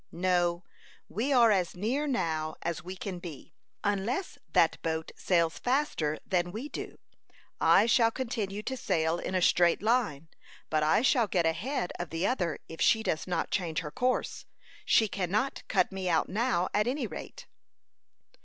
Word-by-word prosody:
"No; 175 Hz, 0 st, +1 dB, 0.5 s
we 245 Hz, +7 st, -1 dB
are 240 Hz, -4 st, +6 dB
as 185 Hz, -4 st, +1 dB
near 245 Hz, +11 st, -1 dB
now 160 Hz, -, -1 dB
as 170 Hz, -2 st, -3 dB
we 185 Hz, +2 st, -6 dB
can 185 Hz, -1 st, -5 dB
be, 165 Hz, -2 st, -10 dB, 0.3 s
unless 205 Hz, -, -1 dB
that -, -, +3 dB
boat 160 Hz, -1 st, -2 dB
sails 170 Hz, -3 st, +1 dB
faster 245 Hz, -, 0 dB
than 175 Hz, -1 st, 0 dB
we 235 Hz, +9 st, -6 dB
do. -, -, -7 dB, 0.6 s
I -, -, +5 dB
shall 230 Hz, 0 st, +4 dB
continue 220 Hz, -5 st, -3 dB
to 260 Hz, -, -3 dB
sail 165 Hz, -8 st, 0 dB
in 185 Hz, -, -4 dB
a 185 Hz, -, +2 dB
straight 175 Hz, +2 st, +3 dB
line, 210 Hz, -, +1 dB, 0.4 s
but 155 Hz, -1 st, +2 dB
I 155 Hz, +9 st, +3 dB
shall 245 Hz, -4 st, +3 dB
get 175 Hz, -4 st, +1 dB
ahead 180 Hz, -, -1 dB
of 175 Hz, -2 st, -4 dB
the 165 Hz, +3 st, -2 dB
other 180 Hz, -, 0 dB
if 165 Hz, -, -9 dB
she 220 Hz, -1 st, +4 dB
does 160 Hz, -5 st, -2 dB
not 175 Hz, -2 st, -2 dB
change 170 Hz, -5 st, -1 dB
her 150 Hz, -2 st, -6 dB
course. 255 Hz, +7 st, -1 dB, 0.4 s
She 220 Hz, -, +4 dB
cannot 200 Hz, +7 st, -1 dB
cut -, -, +2 dB
me 190 Hz, -1 st, -3 dB
out 160 Hz, -2 st, +2 dB
now, 185 Hz, -4 st, 0 dB
at 210 Hz, +2 st, +2 dB
any 260 Hz, +1 st, -1 dB
rate." -, -, -8 dB
185 Hz, 165 wpm, -29 LUFS, 170-230 Hz, 0.6 s, are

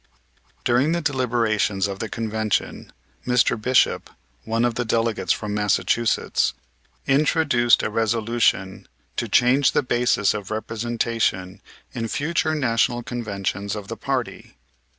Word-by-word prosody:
During 130 Hz, +7 st, +2 dB
the 170 Hz, -, -1 dB
deliberations 115 Hz, -, 0 dB
of 100 Hz, -1 st, -6 dB
the 110 Hz, -, -4 dB
Convention 110 Hz, -1 st, -2 dB, 0.4 s
Mr. 125 Hz, -1 st, +3 dB
Bishop, 125 Hz, +3 st, +1 dB, 0.4 s
one 115 Hz, +2 st, +1 dB
of 120 Hz, -, 0 dB
the 120 Hz, -, -2 dB
delegates 115 Hz, -1 st, 0 dB
from 105 Hz, -1 st, -2 dB
Massachusetts, 105 Hz, +2 st, +1 dB, 0.5 s
introduced 140 Hz, -4 st, +3 dB
a -, -, 0 dB
resolution 115 Hz, -3 st, 0 dB, 0.3 s
to -, -, -3 dB
change 125 Hz, +2 st, +4 dB
the -, -, +2 dB
basis 120 Hz, -5 st, +2 dB
of 105 Hz, -3 st, -6 dB
representation 110 Hz, -3 st, -2 dB, 0.3 s
in 115 Hz, -2 st, -3 dB
future 155 Hz, +5 st, -1 dB
National 120 Hz, -3 st, +1 dB
Conventions 100 Hz, -4 st, -3 dB
of 105 Hz, -2 st, -7 dB
the -, -, -4 dB
party. -, -, -4 dB
115 Hz, 120 wpm, -23 LUFS, 105-125 Hz, 0.5 s, change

